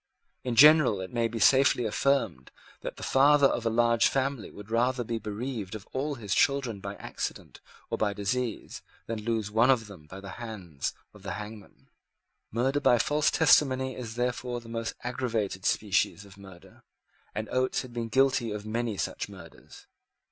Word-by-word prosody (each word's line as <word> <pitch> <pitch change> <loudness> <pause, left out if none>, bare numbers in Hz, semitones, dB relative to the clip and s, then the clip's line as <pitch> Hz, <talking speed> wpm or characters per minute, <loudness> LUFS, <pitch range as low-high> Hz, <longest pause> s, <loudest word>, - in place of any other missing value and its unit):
In 125 -2 -2
general 150 -5 +7
it 95 +3 -7
may 115 -1 +1
be 115 0 -6
safely 125 +3 +4
affirmed 110 - 0 0.3
that - - -6
the - - -8
father 145 +1 +5
of 120 -4 +1
a - - +3
large 115 0 +3
family 135 -3 -1
would 105 +1 -12
rather 120 +2 +1
be 115 0 -3
bereaved 110 -1 -5
of 105 - -9
all 145 +2 -2
his 105 -6 -3
children 135 -7 +1
by 100 +1 -6
accident - - -6 0.3
or - - -2
by 105 -1 +1
disease 110 +4 -3 0.2
than 115 -1 -4
lose 110 -2 -2
one 115 +4 +4
of 125 -4 +3
them 95 -8 -13
by 95 +5 -9
the 100 0 -9
hands 95 -11 -5 0.2
of 105 - -15
the 95 -1 -5
hangman. 105 -1 -10 0.6
Murder 130 +5 +1
by 120 - +4
false 150 +5 +2
testimony 130 -4 +3
is 115 -3 -7
therefore 125 0 -2
the 115 - -15
most 115 0 -4
aggravated 115 -6 -2
species 100 0 +1
of 100 0 -15
murder; 95 -3 -15 0.5
and 110 0 -3
Oates 130 +1 0
had 125 -2 -11
been 120 -1 -3
guilty 130 -2 +2
of 105 0 -5
many 115 -1 -2
such - - -3
murders. - - -14
115 Hz, 175 wpm, -28 LUFS, 105-130 Hz, 0.6 s, general